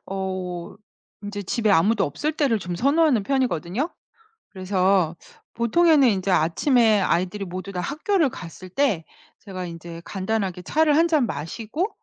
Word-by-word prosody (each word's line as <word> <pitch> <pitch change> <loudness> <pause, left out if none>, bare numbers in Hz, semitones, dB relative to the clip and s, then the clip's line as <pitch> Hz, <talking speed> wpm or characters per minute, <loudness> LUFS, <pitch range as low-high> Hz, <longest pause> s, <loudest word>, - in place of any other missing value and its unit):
어 185 -2 -4 0.5
인제 205 0 -5
집에 215 +3 0
아무도 200 +3 +3
없을 295 - -2
때를 275 -7 +1
좀 180 -2 -5
선호하는 280 - +3
편이거든요. 255 - -1 0.6
그래서 185 -3 +1 0.4
보통에는 290 +5 +4
인제 195 -3 0
아침에 215 - +3
아이들이 185 +2 0
모두 185 +2 -6
다 180 - -3
학교를 310 - 0
갔을 185 -3 -10
때 200 - 0 0.3
제가 185 -3 -7
인제 170 -1 -8
간단하게 190 -2 -2
차를 300 - +2
1 330 +2 +4
잔 310 -6 +3
마시고 220 - -3
200 Hz, 305 characters per minute, -23 LUFS, 180-270 Hz, 0.6 s, 보통에는